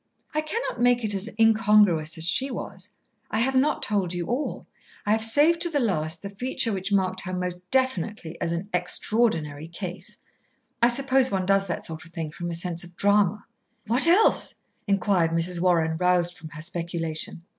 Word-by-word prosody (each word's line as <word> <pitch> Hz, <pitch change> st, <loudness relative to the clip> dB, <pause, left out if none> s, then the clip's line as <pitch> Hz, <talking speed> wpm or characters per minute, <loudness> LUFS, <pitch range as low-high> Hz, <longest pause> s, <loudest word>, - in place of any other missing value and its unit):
"I 305 Hz, -, 0 dB
cannot 310 Hz, -, -4 dB
make 245 Hz, -1 st, +3 dB
it 210 Hz, -1 st, +2 dB
as 200 Hz, +3 st, +1 dB
incongruous 210 Hz, -7 st, +3 dB
as 160 Hz, -, -4 dB
she 265 Hz, +9 st, +2 dB
was. 250 Hz, -, -7 dB, 0.4 s
I -, -, -2 dB
have 255 Hz, +4 st, +1 dB
not 265 Hz, +3 st, +1 dB
told 190 Hz, -4 st, 0 dB
you 175 Hz, -1 st, -3 dB
all. 250 Hz, -, -3 dB, 0.4 s
I 205 Hz, -, 0 dB
have 220 Hz, +1 st, +3 dB
saved 295 Hz, +9 st, +4 dB
to 345 Hz, -, +2 dB
the 295 Hz, -3 st, 0 dB
last 160 Hz, -, -1 dB
the 200 Hz, -, -6 dB
feature 230 Hz, +1 st, 0 dB
which 195 Hz, +1 st, -4 dB
marked 185 Hz, -1 st, +1 dB
her 185 Hz, -, -6 dB
most 180 Hz, 0 st, -3 dB
definitely 215 Hz, -9 st, -1 dB
as 170 Hz, -, -1 dB
an 170 Hz, +4 st, -4 dB
Extraordinary 175 Hz, -5 st, -1 dB
Case. 175 Hz, +2 st, -7 dB, 0.6 s
I 235 Hz, -, +6 dB
suppose 260 Hz, +1 st, +2 dB
one 190 Hz, -2 st, -1 dB
does 195 Hz, +1 st, +2 dB
that 170 Hz, -, -4 dB
sort 160 Hz, -1 st, -8 dB
of 165 Hz, -, -17 dB
thing 160 Hz, -3 st, -5 dB
from 175 Hz, +3 st, -6 dB
a 170 Hz, -, -2 dB
sense 170 Hz, 0 st, -3 dB
of 175 Hz, 0 st, -14 dB
drama." 205 Hz, 0 st, +2 dB, 0.4 s
"What 245 Hz, +8 st, +7 dB
else?" 375 Hz, +6 st, +3 dB, 0.3 s
inquired 195 Hz, -4 st, +1 dB
Mrs. 170 Hz, +1 st, -1 dB
Warren, 165 Hz, -3 st, +1 dB
roused 180 Hz, 0 st, +1 dB
from 160 Hz, -2 st, -11 dB
her 155 Hz, 0 st, -9 dB
speculation. 170 Hz, -1 st, -4 dB
190 Hz, 185 wpm, -25 LUFS, 170-230 Hz, 0.6 s, What